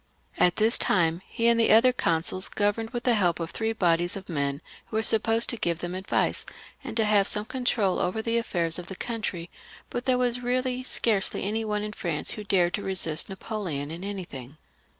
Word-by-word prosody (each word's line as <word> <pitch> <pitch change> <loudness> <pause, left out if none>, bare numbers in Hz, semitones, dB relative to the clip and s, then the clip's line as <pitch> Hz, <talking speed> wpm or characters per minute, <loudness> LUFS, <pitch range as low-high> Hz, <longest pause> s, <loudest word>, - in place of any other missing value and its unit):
At 180 - +4
this 220 +2 +4
time 170 -2 +2
he 230 - 0
and 235 0 +4
the 230 - +3
other 235 +4 +6
consuls 180 -2 0
governed 210 +2 -1
with 240 -1 -5
the 245 - +3
help 180 -6 +1
of 165 -1 -4
three 225 0 -2
bodies 175 -4 +1
of 190 -1 -8
men 140 -2 -2 0.2
who - - -8
were 220 - 0
supposed 225 +1 +2
to 235 - -1
give 170 -5 0
them 175 +1 -5
advice, 190 +1 -1 0.4
and 235 -4 -5
to 220 - +3
have 205 -2 +3
some 210 0 -2
control 230 -7 0
over 185 +5 -1
the 230 +1 +1
affairs 170 -7 -1
of 175 - -8
the 190 - -6
country, 200 -7 -4 0.4
but 245 0 -4
there 255 -1 +3
was 245 0 0
really 255 +1 -1
scarcely 220 -6 +1
any 215 +3 -1
one 210 -1 -2
in 210 0 -5
France 170 -6 -2
who 215 - -6
dared 180 -3 +2
to - - -2
resist 170 -5 +2
Napoleon 185 -8 -4
in 170 +3 -7
anything. 155 -9 -7
205 Hz, 205 wpm, -26 LUFS, 175-230 Hz, 0.4 s, other